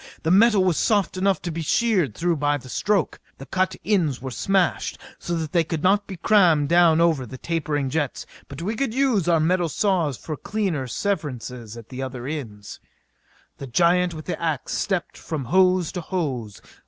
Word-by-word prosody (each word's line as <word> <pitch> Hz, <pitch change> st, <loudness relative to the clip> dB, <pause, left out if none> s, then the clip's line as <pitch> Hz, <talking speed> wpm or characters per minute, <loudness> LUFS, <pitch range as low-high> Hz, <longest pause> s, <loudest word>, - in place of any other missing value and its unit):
The 160 Hz, -, +1 dB
metal 205 Hz, 0 st, +5 dB
was 180 Hz, -4 st, +1 dB
soft 205 Hz, -5 st, +1 dB
enough 190 Hz, +1 st, +1 dB
to 175 Hz, -, -3 dB
be 165 Hz, +1 st, -4 dB
sheered 180 Hz, -, +1 dB
through 170 Hz, -1 st, 0 dB
by 145 Hz, 0 st, +1 dB
the 130 Hz, -2 st, -12 dB
stroke. 195 Hz, -, 0 dB, 0.2 s
The 135 Hz, -, -9 dB
cut 185 Hz, +4 st, 0 dB
ends 170 Hz, -, +1 dB
were 130 Hz, 0 st, -6 dB
smashed 190 Hz, +6 st, 0 dB, 0.2 s
so 175 Hz, -, -3 dB
that 160 Hz, -2 st, -3 dB
they 170 Hz, -, +3 dB
could 160 Hz, -1 st, -4 dB
not 200 Hz, +2 st, +3 dB
be 190 Hz, -3 st, -7 dB
crammed 170 Hz, -7 st, +4 dB
down 170 Hz, -2 st, +5 dB
over 165 Hz, -5 st, +3 dB
the 130 Hz, +2 st, -9 dB
tapering 150 Hz, -3 st, -2 dB
jets; 150 Hz, -3 st, -2 dB, 0.2 s
but 140 Hz, +4 st, -8 dB
we 215 Hz, +5 st, -2 dB
could 245 Hz, -2 st, -2 dB
use 255 Hz, -10 st, +2 dB
our 170 Hz, -2 st, +4 dB
metal 175 Hz, +2 st, +1 dB
saws 170 Hz, -, 0 dB
for 155 Hz, -, -6 dB
cleaner 185 Hz, -9 st, -2 dB
severances 125 Hz, -, -4 dB
at 115 Hz, -1 st, -12 dB
the 130 Hz, 0 st, -6 dB
other 130 Hz, -2 st, -5 dB
ends. 115 Hz, -9 st, -6 dB, 0.8 s
The 140 Hz, -, -6 dB
giant 175 Hz, +5 st, +2 dB
with 155 Hz, -, -8 dB
the 180 Hz, -, -4 dB
ax 160 Hz, -5 st, -2 dB
stepped 190 Hz, -4 st, -2 dB
from 150 Hz, -5 st, -4 dB
hose 185 Hz, +2 st, +3 dB
to 180 Hz, -, -4 dB
hose. 135 Hz, -, -4 dB
165 Hz, 190 wpm, -23 LUFS, 145-185 Hz, 0.8 s, metal